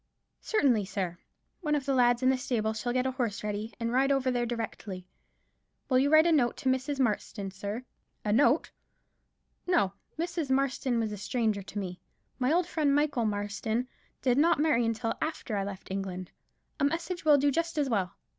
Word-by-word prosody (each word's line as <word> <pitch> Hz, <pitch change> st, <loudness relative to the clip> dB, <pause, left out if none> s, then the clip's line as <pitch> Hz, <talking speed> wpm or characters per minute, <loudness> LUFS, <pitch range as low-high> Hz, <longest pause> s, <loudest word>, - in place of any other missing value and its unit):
"Certainly, 260 Hz, -, +2 dB
sir. 185 Hz, -3 st, -3 dB, 0.4 s
One 300 Hz, -4 st, 0 dB
of 280 Hz, -3 st, -2 dB
the 275 Hz, -, +1 dB
lads 245 Hz, -1 st, +3 dB
in 255 Hz, -, +5 dB
the 265 Hz, -, +1 dB
stable 225 Hz, -4 st, -1 dB
shall 220 Hz, +3 st, -2 dB
get 255 Hz, +1 st, +1 dB
a 260 Hz, -, +1 dB
horse 235 Hz, -6 st, -2 dB
ready, 210 Hz, +2 st, -3 dB
and 230 Hz, 0 st, -1 dB
ride 270 Hz, +3 st, +3 dB
over 265 Hz, -2 st, +2 dB
there 240 Hz, -1 st, 0 dB
directly. 220 Hz, -5 st, -5 dB, 0.8 s
Will 255 Hz, -1 st, +4 dB
you 280 Hz, +2 st, +3 dB
write 310 Hz, +1 st, +7 dB
a 340 Hz, -, +4 dB
note 255 Hz, -7 st, +2 dB
to 265 Hz, -, 0 dB
Mrs. 265 Hz, +2 st, 0 dB
Marston, 210 Hz, -4 st, -1 dB
sir?" 200 Hz, +5 st, -5 dB, 0.4 s
"A 210 Hz, -, +2 dB
note? 275 Hz, +5 st, +3 dB, 1.0 s
No. 330 Hz, -, +2 dB, 0.2 s
Mrs. 335 Hz, -3 st, -2 dB
Marston 265 Hz, -3 st, +1 dB
is 215 Hz, -, -2 dB
a 210 Hz, -, -5 dB
stranger 215 Hz, -1 st, 0 dB
to 200 Hz, -, -9 dB
me. 185 Hz, -3 st, -4 dB, 0.4 s
My 255 Hz, +2 st, +2 dB
old 350 Hz, +2 st, +3 dB
friend 300 Hz, -5 st, +1 dB
Michael 290 Hz, -5 st, +1 dB
Marston 215 Hz, +3 st, -1 dB, 0.4 s
did 255 Hz, 0 st, +3 dB
not 330 Hz, 0 st, +4 dB
marry 255 Hz, -7 st, +3 dB
until 225 Hz, 0 st, -1 dB
after 310 Hz, -8 st, -3 dB
I 200 Hz, -, 0 dB
left 195 Hz, -1 st, -7 dB
England. 185 Hz, -2 st, -4 dB, 0.5 s
A -, -, 0 dB
message 335 Hz, +4 st, -1 dB
will 300 Hz, -2 st, +6 dB
do 285 Hz, +1 st, +3 dB
just 335 Hz, +3 st, -1 dB
as 290 Hz, -2 st, +2 dB
well. 195 Hz, -8 st, -1 dB
245 Hz, 190 wpm, -29 LUFS, 210-285 Hz, 1.0 s, write